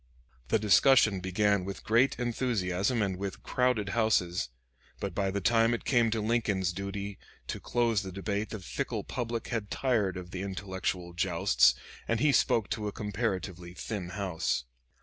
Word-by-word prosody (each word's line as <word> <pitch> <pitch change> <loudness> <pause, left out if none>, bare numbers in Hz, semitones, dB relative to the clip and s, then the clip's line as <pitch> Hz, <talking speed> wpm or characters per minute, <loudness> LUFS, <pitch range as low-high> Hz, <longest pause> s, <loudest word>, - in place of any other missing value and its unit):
The 110 - +3
discussion 105 0 +5
began 100 +1 +1
with 95 +1 -6
great 120 +5 +3
enthusiasm 115 -3 0
and 95 -2 -1
with 100 0 -5
crowded 125 -5 +1
houses, 90 - +1 0.5
but 100 -3 -3
by 95 +1 0
the 100 +1 -2
time 115 +3 +3
it - - -8
came 120 -4 +3
to 110 0 -1
Lincoln's 105 -5 +1
duty 100 +1 -5 0.3
to - - -4
close 115 -4 +1
the 95 -2 -6
debate 100 +3 -2
the 110 - -5
fickle 90 - -3
public 120 -2 -4
had 110 -4 -2
tired 110 -8 0
of 90 -1 -8
the 95 - -4
intellectual 95 -2 -3
jousts, 85 -1 +3 0.3
and 115 -1 +1
he 150 +3 +4
spoke 115 -4 +3
to 105 -1 -2
a - - -2
comparatively 95 -5 -3
thin 95 -3 -4
house. 90 -8 -1
100 Hz, 160 wpm, -30 LUFS, 95-115 Hz, 0.5 s, discussion